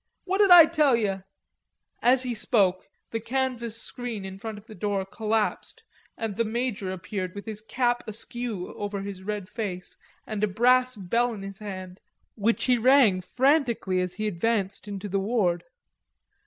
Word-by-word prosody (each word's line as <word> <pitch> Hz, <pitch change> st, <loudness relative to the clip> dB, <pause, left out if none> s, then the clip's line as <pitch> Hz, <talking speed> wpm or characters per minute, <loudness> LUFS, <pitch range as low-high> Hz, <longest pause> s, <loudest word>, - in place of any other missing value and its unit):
What 385 Hz, +1 st, -1 dB
did 405 Hz, -2 st, +5 dB
I 350 Hz, -3 st, +11 dB
tell 305 Hz, -5 st, +3 dB
yer?" 195 Hz, -4 st, -1 dB, 0.8 s
As 255 Hz, +1 st, +5 dB
he 250 Hz, -1 st, -2 dB
spoke 200 Hz, -5 st, +1 dB, 0.2 s
the 225 Hz, -, -1 dB
canvas 235 Hz, -2 st, -2 dB
screen 235 Hz, -5 st, -5 dB
in 190 Hz, 0 st, -8 dB
front 220 Hz, 0 st, -6 dB
of 205 Hz, -, -13 dB
the 220 Hz, -, -12 dB
door 200 Hz, 0 st, -2 dB
collapsed 220 Hz, +1 st, -2 dB, 0.3 s
and 225 Hz, -3 st, -3 dB
the 230 Hz, -, +1 dB
major 225 Hz, -3 st, -2 dB
appeared 185 Hz, 0 st, -5 dB
with 200 Hz, -, -7 dB
his 215 Hz, -2 st, -6 dB
cap 240 Hz, +2 st, 0 dB
askew 225 Hz, -2 st, -5 dB
over 205 Hz, -1 st, -4 dB
his 200 Hz, -2 st, -6 dB
red 205 Hz, -1 st, -4 dB
face 190 Hz, -5 st, -5 dB, 0.3 s
and 215 Hz, -1 st, -3 dB
a -, -, +4 dB
brass 250 Hz, +5 st, +3 dB
bell 230 Hz, +5 st, 0 dB
in 195 Hz, -, -8 dB
his 195 Hz, 0 st, -8 dB
hand, 185 Hz, -3 st, -7 dB, 0.3 s
which 225 Hz, +2 st, 0 dB
he 250 Hz, -2 st, +3 dB
rang 240 Hz, -6 st, +5 dB
frantically 245 Hz, -, +1 dB
as 180 Hz, -1 st, -3 dB
he 215 Hz, -, -3 dB
advanced 205 Hz, +1 st, -1 dB
into 200 Hz, 0 st, -5 dB
the 195 Hz, 0 st, 0 dB
ward. 195 Hz, -5 st, 0 dB
215 Hz, 170 wpm, -26 LUFS, 195-240 Hz, 0.8 s, I